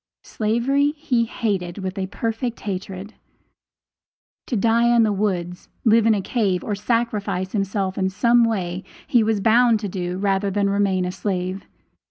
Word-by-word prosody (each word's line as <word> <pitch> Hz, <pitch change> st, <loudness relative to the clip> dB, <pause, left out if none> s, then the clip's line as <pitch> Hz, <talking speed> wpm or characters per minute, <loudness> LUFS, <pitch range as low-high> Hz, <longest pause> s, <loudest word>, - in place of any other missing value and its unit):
Slavery 260 Hz, +7 st, +1 dB
he 250 Hz, -6 st, +1 dB
hated 195 Hz, -7 st, -2 dB
with 190 Hz, -1 st, -4 dB
a 190 Hz, -2 st, -3 dB
perfect 225 Hz, +3 st, -3 dB
hatred. 195 Hz, +1 st, -5 dB, 1.3 s
To 245 Hz, -, -2 dB
die 230 Hz, +2 st, +3 dB
in 230 Hz, -, +5 dB
the 215 Hz, -2 st, +2 dB
woods, 180 Hz, -3 st, -2 dB, 0.2 s
live 225 Hz, 0 st, +5 dB
in 220 Hz, -, +5 dB
a 195 Hz, -, -2 dB
cave, 200 Hz, -7 st, 0 dB
or 210 Hz, -, -2 dB
sacrifice 205 Hz, -3 st, -1 dB
himself 195 Hz, -2 st, -1 dB
in 190 Hz, 0 st, +1 dB
some 235 Hz, +5 st, +3 dB
way, 190 Hz, -5 st, -1 dB, 0.2 s
he 240 Hz, -, +3 dB
was 215 Hz, -2 st, +1 dB
bound 230 Hz, +1 st, +4 dB
to 205 Hz, -, -2 dB
do, 180 Hz, -1 st, -4 dB
rather 195 Hz, 0 st, 0 dB
than 200 Hz, 0 st, 0 dB
remain 195 Hz, -2 st, +1 dB
a 180 Hz, -, -2 dB
slave. 185 Hz, 0 st, -3 dB
205 Hz, 160 wpm, -22 LUFS, 190-230 Hz, 1.3 s, in